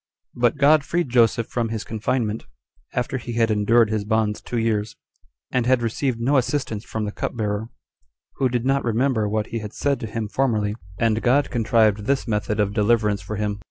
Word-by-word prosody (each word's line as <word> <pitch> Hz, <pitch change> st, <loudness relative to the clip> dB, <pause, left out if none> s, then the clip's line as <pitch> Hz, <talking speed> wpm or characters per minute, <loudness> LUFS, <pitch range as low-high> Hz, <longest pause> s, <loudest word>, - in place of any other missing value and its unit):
4. -, -, -11 dB
But 120 Hz, +4 st, +3 dB
God 150 Hz, +1 st, +5 dB
freed 170 Hz, -1 st, -1 dB
Joseph 115 Hz, -2 st, +3 dB
from 115 Hz, -1 st, -2 dB
his 110 Hz, -1 st, -3 dB
confinement, 110 Hz, 0 st, -2 dB, 0.5 s
after 125 Hz, +2 st, -1 dB
he 120 Hz, 0 st, -6 dB
had 115 Hz, -1 st, +2 dB
endured 110 Hz, +2 st, +3 dB
his 110 Hz, -2 st, 0 dB
bonds 110 Hz, 0 st, 0 dB
two 120 Hz, -, -4 dB
years, 110 Hz, -2 st, 0 dB, 0.6 s
and 125 Hz, -2 st, 0 dB
had 130 Hz, -2 st, +3 dB
received 115 Hz, +2 st, -1 dB
no 135 Hz, +5 st, +2 dB
assistance 125 Hz, -5 st, -1 dB
from 110 Hz, -2 st, -4 dB
the 105 Hz, -, -3 dB
cupbearer, 110 Hz, 0 st, -3 dB, 0.7 s
who 130 Hz, -, +2 dB
did 120 Hz, 0 st, -1 dB
not 135 Hz, +1 st, +2 dB
remember 115 Hz, -2 st, +1 dB
what 110 Hz, 0 st, -1 dB
he 115 Hz, -, -1 dB
had 105 Hz, -1 st, -7 dB
said 140 Hz, -1 st, 0 dB
to 115 Hz, -, -5 dB
him 110 Hz, 0 st, -3 dB
formerly; 105 Hz, -4 st, 0 dB, 0.2 s
and 115 Hz, 0 st, +1 dB
God 135 Hz, +3 st, +2 dB
contrived 110 Hz, -3 st, +2 dB
this 140 Hz, +1 st, 0 dB
method 105 Hz, -1 st, -1 dB
of 100 Hz, -1 st, +1 dB
deliverance 105 Hz, -1 st, +2 dB
for 100 Hz, +4 st, -5 dB
him. 105 Hz, 0 st, -2 dB
115 Hz, 195 wpm, -23 LUFS, 105-125 Hz, 0.7 s, God